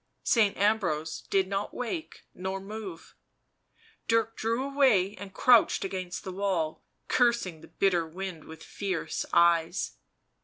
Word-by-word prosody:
Saint 215 -4 +3
Ambrose 180 -7 0
did 190 -1 +2
not 200 +1 -3
wake 280 +7 -5
nor 190 +1 -4
move; 195 -3 -8 0.9
Dirk 225 0 +2
drew 230 +3 -1
away 260 -9 +3
and 195 0 -8
crouched 240 -1 +4
against 185 -2 -4
the 190 - -5
wall, 185 -5 -1 0.3
cursing 235 -10 +1
the - - -13
bitter 175 -4 +1
wind 180 -1 -6
with 160 0 -11
fierce 190 -5 -3
eyes. 170 0 +3
195 Hz, 125 wpm, -28 LUFS, 175-220 Hz, 0.9 s, crouched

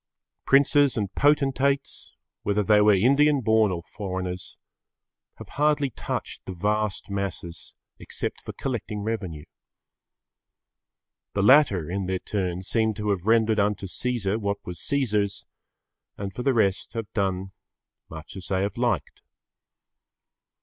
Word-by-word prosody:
Princes 140 -1 +4
and 100 -3 -2
potentates, 140 -1 +1 0.3
whether 105 +1 +1
they 105 +1 +5
were 105 -1 +6
Indian 140 +8 +4
born 110 -2 +3
or 85 -2 -4
foreigners, 90 -2 -5 0.8
have - - -11
hardly 145 -1 +1
touched - - -5
the 95 - -6
vast 105 +2 -1
masses 95 -4 -5 0.2
except - - -4
for - - -7
collecting 110 -5 -4
revenue. 95 -9 -4 1.9
The 100 - 0
latter 105 - +5
in 95 +1 -3
their 95 0 0
turn 90 -2 -3
seem 110 +2 0
to 105 0 -1
have 95 0 -2
rendered 110 -1 +3
unto 100 0 0
Caesar 110 0 -2
what 100 -1 -1
was 90 -2 -7
Caesar's 105 -8 -1 0.7
and 100 -1 -5
for 125 - -5
the 130 0 +2
rest 100 -3 +1
have 115 -2 -5
done 95 -2 -1 0.6
much 80 +1 -10
as 95 - -6
they 95 0 0
have 100 -1 -3
liked. - - -1
105 Hz, 130 wpm, -25 LUFS, 95-120 Hz, 1.9 s, were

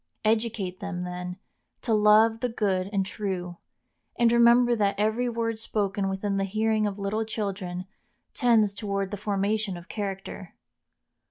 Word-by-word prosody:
Educate 215 -4 0
them, 195 -3 -4
then, 180 0 -5 0.5
to 230 - +1
love 215 +1 +5
the 250 - -1
good 195 -4 0
and 195 -2 +1
true, 185 -3 -4 0.6
and 235 -1 +4
remember 235 +1 +5
that 200 -3 +1
every 220 +4 +1
word 230 -1 -2
spoken 200 -2 -1
within 195 +1 -2
the 195 - +1
hearing 215 +2 +1
of 200 -1 -4
little 205 +2 -1
children 195 -5 -4 0.5
tends 225 -5 +3
toward 200 -1 -3
the - - -2
formation 205 0 -1
of 175 +1 -12
character. 195 -3 -5
205 Hz, 145 wpm, -27 LUFS, 195-220 Hz, 0.6 s, love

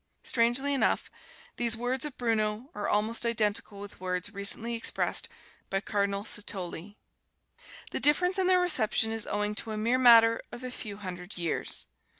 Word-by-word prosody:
Strangely 245 +4 +1
enough, 275 - 0 0.5
these 235 -1 +1
words 250 +3 -1
of 295 -3 -7
Bruno 225 +2 -1
are 205 - -3
almost 215 +3 0
identical 215 -3 -1
with 205 0 -10
words 185 +1 -3
recently 200 +4 +1
expressed 230 - +1 0.4
by 195 - 0
Cardinal 200 0 -1
Satolli. 200 -2 -4 0.9
The - - -2
difference 360 +6 +3
in 370 - +2
their 370 -1 +4
reception 225 -9 +3
is 225 -1 -3
owing 210 0 -1
to 220 +1 -5
a - - -4
mere 235 +4 +1
matter 230 -2 +7
of 240 - -9
a 255 - -5
few 210 -4 -6
hundred 185 -1 -8
years. 170 -2 -2
220 Hz, 155 wpm, -28 LUFS, 205-240 Hz, 0.9 s, matter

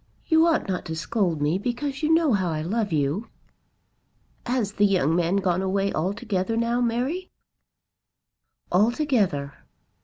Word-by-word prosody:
You 320 +1 +4
ought 325 -8 +1
not 185 -2 -2
to 160 - -4
scold 170 -3 -1
me, 155 +6 +1
because 265 +5 -3
you 310 0 +1
know 320 -5 +4
how 190 -4 +1
I 155 -1 -2
love 210 +4 -1
you." 155 +8 0 1.2
"Has 240 -5 0
the 205 0 +2
young 170 -5 +2
man 175 +2 +1
gone 185 -2 +1
away 195 +1 0
altogether 200 +4 -1
now, 235 +1 +1
Mary?" 255 +10 -1 1.4
"Altogether." 205 - +1
200 Hz, 140 wpm, -25 LUFS, 175-245 Hz, 1.4 s, You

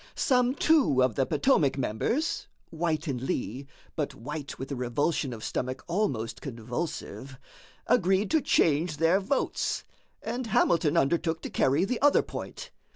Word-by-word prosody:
Some 250 -2 +2
two 280 - +4
of 125 -2 +2
the 135 +4 0
Potomac 150 - +2
members 140 - -1 0.2
(White 160 -1 -1
and 130 -6 -3
Lee, 130 0 -3 0.3
but - - -2
White 145 +6 -6
with 135 +2 -6
a - - -1
revulsion 125 +3 -1
of 110 -2 -7
stomach 130 +1 -3
almost 165 - -1
convulsive) 125 0 -5 0.5
agreed 190 -2 +2
to 315 - +4
change 155 - +2
their 165 +4 +3
votes, 205 +8 -1 0.4
and 250 -1 -3
Hamilton 170 -5 +2
undertook 160 +2 +1
to - - -5
carry 140 +7 +2
the 235 +3 -2
other 290 0 +5
point. - - -7
155 Hz, 145 wpm, -28 LUFS, 130-195 Hz, 0.5 s, other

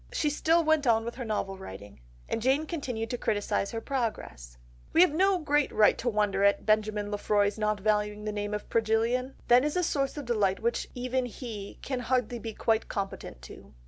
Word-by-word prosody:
She 295 - 0
still 330 +3 +2
went 315 -3 +2
on 225 -1 +3
with 235 - -4
her 250 - -6
novel 200 -4 -3
writing. 100 - -10 0.3
And - - -2
Jane 270 +6 +2
continued 250 -9 -4
to 245 - -3
criticise 205 -2 0
her 225 - -4
progress— 140 - -4 0.4
"We 330 - +6
have 360 -5 +5
no 380 +3 +3
great 295 -3 +1
right 210 -1 +5
to 240 - 0
wonder 205 -3 +1
at 200 0 +5
his - - -20
[Benjamin 215 -1 +1
Lefroy's] 205 0 +1
not 210 -1 0
valuing 210 0 0
the 215 - -2
name 205 0 -3
of 210 - -6
Progillian. 230 +4 0
That 245 +1 +6
is 300 +2 -1
a 360 - +1
source 275 -3 -1
of 290 - -5
delight 210 -5 +1
which 235 +1 -1
even 255 0 -1
he 220 -4 -7
can 260 -2 -2
hardly 245 0 -1
be 225 -1 -6
quite 225 -1 +1
competent 195 - -5
to." 60 - -13
225 Hz, 205 wpm, -28 LUFS, 210-260 Hz, 0.4 s, We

